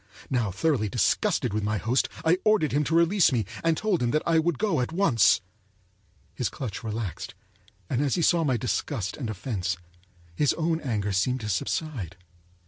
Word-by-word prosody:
Now 120 -5 +1
thoroughly 110 - 0
disgusted 125 - +1
with 105 - 0
my 105 +1 0
host, 120 +5 +1 0.2
I 170 +3 +4
ordered 215 -8 +3
him 145 +2 +2
to 165 - 0
release 170 +2 +4
me, 115 -4 0 0.2
and 165 -1 +2
told 210 -5 0
him 120 -1 +1
I 165 -1 +3
would 165 -2 0
go 195 -9 +1
at 125 - -2
once. 165 - +4 0.9
His 125 -6 -2
clutch 115 -6 -6
relaxed, 105 -6 -5 0.5
and 125 +6 0
as 145 -3 +1
he 170 - 0
saw 170 +1 +3
my 130 -5 +1
disgust 110 - -2
and 125 -6 -5
offense, 95 -5 -3 0.6
his 145 - +2
own 165 0 -1
anger 105 -6 -1
seemed 125 +7 0
to 105 - -4
subside. 100 - -3
130 Hz, 175 wpm, -26 LUFS, 105-160 Hz, 0.9 s, I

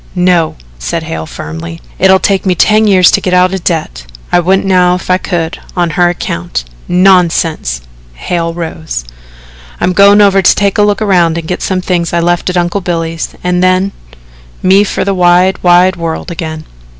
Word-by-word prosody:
"No," 180 -3 +1 0.2
said - - -3
Hale 80 0 -6
firmly. 80 +2 -8 0.2
"It'll 190 0 +5
take 195 0 0
me 185 -2 0
ten 215 +4 +3
years 185 -3 +5
to - - +1
get 180 -1 0
out 180 +1 +3
of 190 -3 -4
debt. - - -3 0.2
I 175 - +3
wouldn't 190 +3 +1
now 180 -2 +3
if 180 - -4
I 185 - +2
could 170 -2 -3 0.2
on 175 -1 0
her 175 0 +2
account." 85 - -4 0.2
"Nonsense." 175 - +1 0.3
Hale 165 - -3
rose. 160 - -6 0.7
"I'm 180 - 0
going 200 +2 +5
over 195 -1 +4
to 185 - +4
take 200 0 0
a - - +5
look 205 +1 +1
around 175 -5 +2
and 165 -1 -5
get 180 - -3
some 185 -1 -1
things 175 -2 -2
I 170 - +1
left 175 +1 0
at 180 - -2
Uncle 175 +3 -1
Billy's 165 -2 -4
and 180 0 0
then 185 +1 +2 0.7
me 190 +2 +4
for 200 - -2
the 200 - 0
wide, 180 +1 +2
wide 180 +1 +3
world 165 +1 -4
again." 160 -2 -6
180 Hz, 185 wpm, -11 LUFS, 165-185 Hz, 0.7 s, It'll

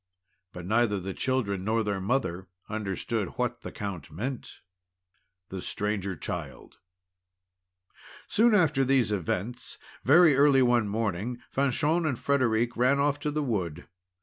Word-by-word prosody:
But 90 -1 -8
neither 110 0 +2
the 95 +1 -5
children 105 -8 -1
nor 110 +2 +1
their 100 -2 -2
mother 95 -5 -1 0.2
understood 105 0 -3
what 120 -1 -2
the - - -7
Count 100 -6 -6
meant. 120 - -6 0.9
THE 95 -1 -6
STRANGER 100 -2 -2
CHILD - - -7 1.5
Soon 225 0 +4
after 155 -8 +3
these 130 -4 +2
events 105 +5 -3 0.3
very 160 +2 +6
early 140 -1 +5
one 120 -3 +3
morning 110 +2 -2
Fanchon 150 +5 +1
and 130 -6 -1
Frederic 120 -4 +1
ran 125 +4 +3
off 145 +1 +1
to 150 - -2
the 150 0 -1
wood. 90 - -3
120 Hz, 130 wpm, -28 LUFS, 100-135 Hz, 1.5 s, very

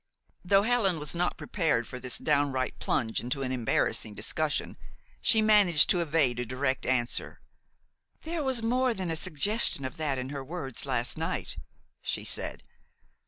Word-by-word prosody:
Though 195 +2 +3
Helen 215 -6 +2
was 150 -1 -2
not 175 +1 -1
prepared 160 - -1
for 125 - -7
this 125 -1 -4
downright 140 -3 -1
plunge 110 -1 -1
into 135 +3 -3
an 130 - -2
embarrassing 115 -3 -1
discussion, 155 +5 -1 0.5
she 220 -1 +4
managed 205 -8 +6
to 180 - +2
evade 150 -7 +1
a 125 - -2
direct 130 +2 -2
answer. 125 -2 0 0.8
"There 325 0 -3
was 260 -5 +1
more 250 +1 +1
than 185 -4 -3
a - - -1
suggestion 160 - +3
of 130 - -6
that 150 -4 -1
in 130 0 -5
her 140 -1 -5
words 140 -4 -4
last 125 -2 -1
night," - - -3 0.4
she - - -4
said. - - -2
150 Hz, 160 wpm, -28 LUFS, 130-195 Hz, 0.8 s, managed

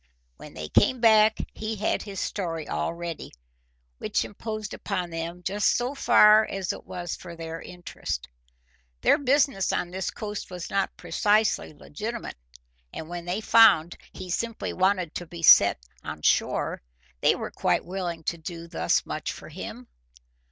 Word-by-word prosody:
When - - -12
they 75 - -5
came 255 - +3
back 220 -1 +5 0.2
he 220 +1 -4
had 210 +1 0
his 200 -3 -6
story 165 -5 -3
all 75 0 -1
ready, 170 -1 -6 0.7
which - - 0
imposed 215 0 -6
upon 185 -4 -3
them 165 +2 -5
just 200 +2 +2
so 245 +3 -2
far 215 -5 +6
as 195 -4 -3
it - - -11
was 175 -2 -4
for 170 - -10
their 165 0 -6
interest. 175 - -6 0.7
Their - - +4
business 275 -7 +2
on 175 - -2
this 190 +1 -3
coast 210 -2 -6
was 180 -2 -7
not 195 -1 -1
precisely 210 +1 +1
legitimate, 215 - -6 0.5
and 160 - -7
when 175 -1 -6
they 180 +4 -2
found 220 -8 +6 0.2
he 185 -1 -8
simply 230 +4 -2
wanted 185 -3 +1
to 175 - -6
be 170 0 -9
set 100 -9 +8 0.3
on - - -7
shore, - - +1 0.4
they - - +4
were - - -5
quite - - 0
willing 175 -3 -4
to 170 +2 -3
do 165 +1 -7
thus - - 0
much - - -4
for - - -10
him. - - -8
185 Hz, 160 wpm, -26 LUFS, 170-215 Hz, 0.7 s, set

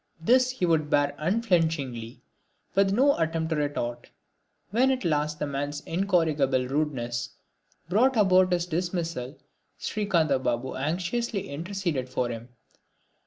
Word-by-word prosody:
This 250 +9 +4
he 255 -8 -1
would 160 -3 +1
bear 145 -1 +2
unflinchingly, 160 - 0 0.5
with 195 0 +3
no 270 +7 +4
attempt 165 0 -1
at 155 - +1
retort. 120 -5 -3 0.6
When 250 +5 +3
at 255 -6 0
last 150 -1 0
the 150 - -2
man's 145 +1 -3
incorrigible 160 -8 +1
rudeness 125 -5 -2 0.6
brought 235 +8 +3
about 185 -3 +5
his 175 -1 +1
dismissal 170 -6 -3 0.4
Srikantha 165 -10 +1
Babu 125 0 -2
anxiously 180 - -2
interceded 165 -4 -3
for 125 -1 -1
him. 115 +1 -7
160 Hz, 120 wpm, -27 LUFS, 140-190 Hz, 0.6 s, about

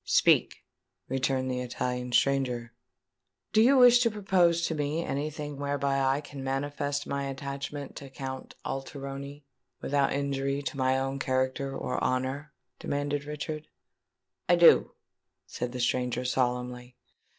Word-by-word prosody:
"Speak," - - +3 0.4
returned 130 0 0
the 125 - -2
Italian 125 0 -3
stranger. 125 -2 +1 0.8
"Do 215 - +6
you 265 +4 +6
wish 245 -1 +8
to 240 -1 +3
propose 180 -5 +2
to - - -1
me 150 +2 -1
any 145 +3 -2
thing 150 -1 -6
whereby 140 -1 0
I 135 +1 +2
can 140 -2 -9
manifest 145 +1 -2
my 140 0 -2
attachment 140 +1 -5
to 140 - -8
Count 130 -1 -7
Alteroni, 140 +1 -6 0.4
without 140 0 +1
injury 140 0 -1
to 140 - -4
my 130 -1 +2
own 135 +1 -2
character 130 +1 -1
or 125 - -2
honour?" 130 +3 -1 0.3
demanded 145 0 -2
Richard. 150 +1 -5 0.8
"I 175 - +7
do," 170 -1 +6 0.5
said 125 0 -4
the 125 - -5
stranger 125 0 0
solemnly. 125 -1 -1
140 Hz, 135 wpm, -29 LUFS, 130-145 Hz, 0.8 s, wish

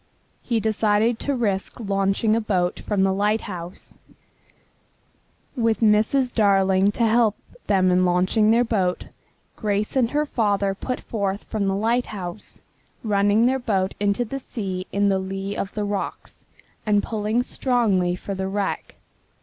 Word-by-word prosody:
He 235 -2 0
decided 220 +1 +1
to 285 - -1
risk 205 -5 -1
launching 200 +1 +1
a 230 - +1
boat 180 -5 0
from 200 -3 0
the 190 0 +2
lighthouse. 200 -3 -3 1.6
With 230 -3 +1
Mrs. 225 +4 +3
Darling 195 -2 +3
to 235 - +1
help 225 -1 +3 0.3
them 185 -2 +3
in 180 0 +3
launching 185 +5 +2
their 230 +2 +4
boat, 195 -6 -1 0.5
Grace 210 +1 -1
and 250 -3 +3
her 295 +3 0
father 205 -7 0
put 250 +6 -4
forth 200 -2 -3
from 205 -2 -2
the 195 - +1
lighthouse, 215 -4 -3 0.4
running 205 +1 +3
their 265 +2 +2
boat 195 -6 0
into 205 +4 +1
the 270 +5 -5
sea 190 -7 -5
in 200 0 +2
the 195 -1 +2
lee 195 +1 -4
of 195 - -3
the 210 -1 -1
rocks, 205 -1 -5 0.4
and 205 -1 +2
pulling 220 +2 -1
strongly 215 -10 +1
for 200 +2 -6
the 190 0 -3
wreck. 200 0 -3
205 Hz, 145 wpm, -23 LUFS, 195-225 Hz, 1.6 s, their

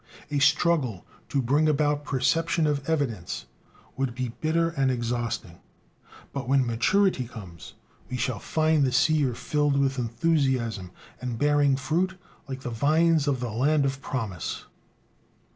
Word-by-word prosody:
A 145 - +1
struggle 145 - +2 0.2
"to 135 -2 0
bring 145 +6 +3
about 145 0 +1
perception 160 +4 +1
of 145 -1 -1
evidence" 125 - -2 0.5
would 130 -3 -2
be 130 -1 -2
bitter 165 +1 +2
and 135 -5 0
exhausting. 120 -7 -3 0.7
But 135 -3 -4
when 135 -1 +4
maturity 130 - +2
comes, 95 -9 -10 0.4
we 125 - -3
shall 125 -3 -1
find 155 +2 +2
the 130 - +2
seer 145 -4 +2
filled 145 0 0
with 135 -1 +1
enthusiasm, 120 - 0 0.3
and 125 -2 -3
bearing 145 0 +3
fruit 170 +8 0 0.3
like 130 -1 -5
the 125 - -5
vines 155 +5 +3
of 135 -3 0
the 120 -2 -3
Land 140 +6 +2
of 135 0 -2
Promise. 110 - -4
135 Hz, 140 wpm, -26 LUFS, 120-150 Hz, 0.7 s, when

